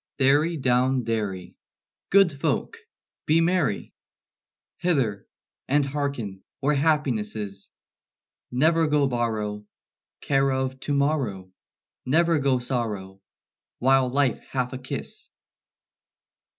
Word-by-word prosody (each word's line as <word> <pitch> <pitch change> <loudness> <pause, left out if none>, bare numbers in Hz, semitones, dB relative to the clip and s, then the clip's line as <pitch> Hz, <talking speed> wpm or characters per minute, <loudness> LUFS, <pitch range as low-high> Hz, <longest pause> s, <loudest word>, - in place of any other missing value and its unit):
"Derry 145 +5 +3
down 130 -1 +2
derry! 105 -5 -3 0.5
Good 195 -3 +5
folk, 140 - -2 0.5
be 155 +2 +4
merry! 165 - 0 0.8
Hither, 130 - 0 0.4
and 145 +1 +2
hearken 135 -9 -3 0.2
where 145 +2 +1
happiness 140 -8 +1
is! 100 -2 -6 0.8
Never 160 +5 +3
go 150 -1 +3
borrow 110 -5 -2 0.6
Care 135 -1 +1
of 130 0 -2
to 145 +2 -2
morrow, 130 -11 -1 0.5
Never 165 +4 +3
go 135 -2 +2
sorrow 105 -6 -3 0.6
While 130 0 +3
life 135 -2 +1
hath 125 -1 -3
a 130 - -5
kiss." 130 - -6
130 Hz, 100 wpm, -25 LUFS, 115-145 Hz, 0.8 s, Good